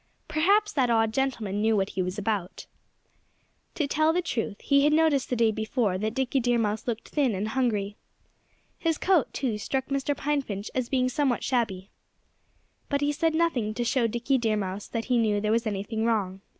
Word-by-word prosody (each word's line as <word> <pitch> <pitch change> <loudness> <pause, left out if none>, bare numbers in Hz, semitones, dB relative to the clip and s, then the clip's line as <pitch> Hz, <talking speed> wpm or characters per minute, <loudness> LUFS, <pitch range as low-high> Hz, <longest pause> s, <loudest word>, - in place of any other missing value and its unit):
Perhaps 395 +8 +2
that 260 -4 +2
odd 225 -1 +2
gentleman 225 -6 -1
knew 220 0 +3
what 195 0 0
he 190 - -2
was 180 +2 -3
about. 205 -3 -3 1.1
To 310 - 0
tell 310 +3 +2
the 355 +2 +1
truth, 225 - -3
he 280 0 +3
had 300 +1 +4
noticed 310 -4 +3
the 250 - 0
day 230 -2 +3
before 220 -3 -1
that 215 +2 -2
Dickie 265 0 +1
Deer 240 -1 +1
Mouse 220 0 -1
looked 230 -2 -3
thin 270 -8 +1
and 205 +3 -2
hungry. 210 -5 -1 0.8
His 325 -2 0
coat, 365 -5 +2
too, 230 -6 -2
struck 265 +5 -2
Mr. 275 +1 -1
Pine 295 0 0
Finch 205 -5 -6
as 255 -2 -2
being 255 -2 +2
somewhat 255 -1 0
shabby. 215 -7 -1 1.0
But 280 0 0
he 290 0 +2
said 315 +2 0
nothing 255 -11 0
to 240 - -1
show 235 0 +1
Dickie 240 +4 0
Deer 220 -2 +1
Mouse 195 0 -4
that 230 -1 -3
he 250 -2 +2
knew 210 -2 +2
there 210 +1 0
was 230 +1 +1
anything 215 +2 -2
wrong. 200 -5 0
235 Hz, 195 wpm, -27 LUFS, 210-275 Hz, 1.1 s, had